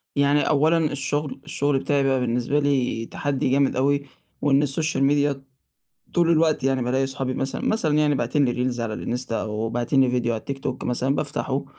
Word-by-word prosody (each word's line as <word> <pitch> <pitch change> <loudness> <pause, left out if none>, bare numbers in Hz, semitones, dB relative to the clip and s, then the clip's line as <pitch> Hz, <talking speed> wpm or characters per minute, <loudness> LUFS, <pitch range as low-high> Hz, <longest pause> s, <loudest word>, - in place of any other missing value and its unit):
يعني 140 +1 +3
أولًا 155 +3 +3
الشغل، 145 +1 -2
الشغل 145 -1 0
بتاعي 140 +1 +1
بقى 135 -1 +2
بالنسبة 125 +3 0
لي 135 -5 0
تحدّي 135 +1 -2
جامد 140 +1 +2
أوي 140 +2 +1 0.4
وإن 140 0 +3
السوشيال 145 0 0
ميديا 140 -1 +1 0.7
طول 170 -1 +3
الوقت 160 -4 +2
يعني 135 -1 +1
بالاقي 130 +2 +1
أصحابي 135 -1 -3
مثلًا، 135 +1 -3
مثلًا 170 -9 +1
يعني 150 -1 +3
باعتين 140 +3 +1
لي 125 0 0
reels 120 - -5
على 115 -2 -2
الإنستا 120 0 -3
أو 110 +1 -3
باعتين 120 +3 +1
لي 130 -1 +3
فيديو 120 -1 0
على 110 - -3
التيك 140 +3 -6
توك 130 -1 -4
مثلًا 125 +2 0
بافتَحه 140 -2 -2
135 Hz, 185 wpm, -23 LUFS, 125-145 Hz, 0.7 s, يعني